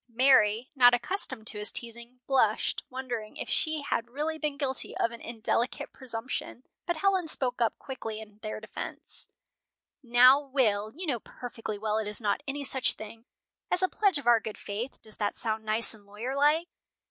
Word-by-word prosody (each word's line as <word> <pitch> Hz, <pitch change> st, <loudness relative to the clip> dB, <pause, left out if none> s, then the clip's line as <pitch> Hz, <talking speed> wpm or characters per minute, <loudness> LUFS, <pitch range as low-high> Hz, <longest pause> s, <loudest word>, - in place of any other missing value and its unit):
Mary, 235 Hz, -2 st, +4 dB
not 245 Hz, -2 st, +7 dB
accustomed 260 Hz, -, -2 dB
to 215 Hz, -2 st, -3 dB
his 210 Hz, -, -1 dB
teasing, 235 Hz, +1 st, +1 dB
blushed, 240 Hz, -6 st, +1 dB
wondering 245 Hz, -4 st, -5 dB
if -, -, -5 dB
she 315 Hz, -2 st, 0 dB
had 235 Hz, -4 st, -2 dB
really 305 Hz, +5 st, -3 dB
been 300 Hz, -2 st, -2 dB
guilty 270 Hz, -2 st, -1 dB
of 230 Hz, -, +1 dB
an 235 Hz, -, -9 dB
indelicate 235 Hz, +1 st, -1 dB
presumption, 250 Hz, 0 st, -5 dB, 0.2 s
but 345 Hz, -, +1 dB
Helen 375 Hz, 0 st, +1 dB
spoke 250 Hz, -5 st, +2 dB
up 230 Hz, -, +1 dB
quickly 225 Hz, -5 st, -6 dB
in 210 Hz, -1 st, -12 dB
their 215 Hz, 0 st, -5 dB
defense: 220 Hz, -, -8 dB, 0.7 s
"Now, 250 Hz, +2 st, +7 dB
Will 235 Hz, -7 st, 0 dB
you 350 Hz, +9 st, -7 dB
know 265 Hz, -7 st, -1 dB
perfectly 225 Hz, -2 st, -7 dB
well 215 Hz, +1 st, -1 dB
it 215 Hz, -, -3 dB
is 210 Hz, -, -1 dB
not 210 Hz, +3 st, 0 dB
any 280 Hz, +1 st, -3 dB
such 265 Hz, -1 st, +3 dB
thing. 225 Hz, +2 st, -10 dB, 0.4 s
As 360 Hz, -, +1 dB
a -, -, +5 dB
pledge 395 Hz, -4 st, +2 dB
of 285 Hz, -, -7 dB
our 240 Hz, -1 st, +6 dB
good 220 Hz, -1 st, -7 dB
faith 220 Hz, +6 st, -5 dB
does 215 Hz, -1 st, -14 dB
that 205 Hz, -1 st, -1 dB
sound 220 Hz, -1 st, -2 dB
nice 220 Hz, +2 st, +2 dB
and 205 Hz, -2 st, -17 dB
lawyer 225 Hz, +6 st, -5 dB
like?" 300 Hz, +4 st, +3 dB
240 Hz, 180 wpm, -29 LUFS, 220-275 Hz, 0.7 s, not